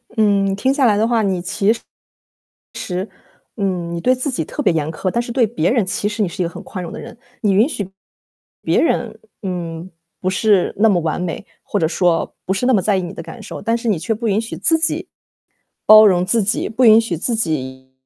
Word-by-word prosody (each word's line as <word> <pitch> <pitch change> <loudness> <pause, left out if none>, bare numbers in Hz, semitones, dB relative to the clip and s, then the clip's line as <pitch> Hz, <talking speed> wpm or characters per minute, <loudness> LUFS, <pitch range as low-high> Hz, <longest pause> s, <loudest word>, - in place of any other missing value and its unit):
嗯， 200 -3 +2
听 260 +7 +1
下 275 -2 +2
来 215 -3 +4
的 215 - +2
话， 235 -1 +2
你 190 -4 0
其 200 +4 +1
实 230 - -10 1.8
嗯， 185 -5 -2
你 170 - -3
对 255 +8 +3
自 255 +3 -2
己 255 - -2
特 295 - -5
别 - - +3
严 155 -2 -1
苛， 185 +4 -2
但 235 - 0
是 240 0 -5
对 245 -2 +3
别 190 -6 0
人， 235 -5 +2
其 190 +2 -1
实 210 +1 -2
你 200 - +1
是 175 - -4
一 - - 0
个 - - -2
很 - - -9
宽 185 - -7
容 170 - -7
的 - - -7
人。 - - -11 0.2
你 205 -3 +2
允 210 +7 +4
许 205 - -5 0.7
别 - - +2
人， - - 0 0.2
嗯， 175 -2 -5 0.3
不 185 - 0
是 195 0 +2
那 225 - +5
么 190 -4 +2
完 160 +1 -2
美， 175 -3 -4 0.2
或 - - -2
者 160 - +2
说 170 -1 0
不 190 - 0
是 220 +6 -1
那 260 - +4
么 210 - +3
在 200 +1 +1
意 190 - -1
你 175 0 -6
的 - - -8
感 230 - -10
受。 - - -8
但 230 +1 0
是 235 0 -4
你 200 -6 +1
却 185 +8 -2
不 225 +1 -3
允 205 +1 +2
许 230 - -6
自 325 -1 +2
己 325 +1 -1 0.8
包 215 0 +9
容 180 -3 +3
自 225 +4 +2
己， 210 +4 0
不 245 +3 +1
允 220 0 +8
许 225 -7 -3
自 230 +9 -1
己 130 - -3
200 Hz, 255 characters per minute, -19 LUFS, 180-230 Hz, 1.8 s, 包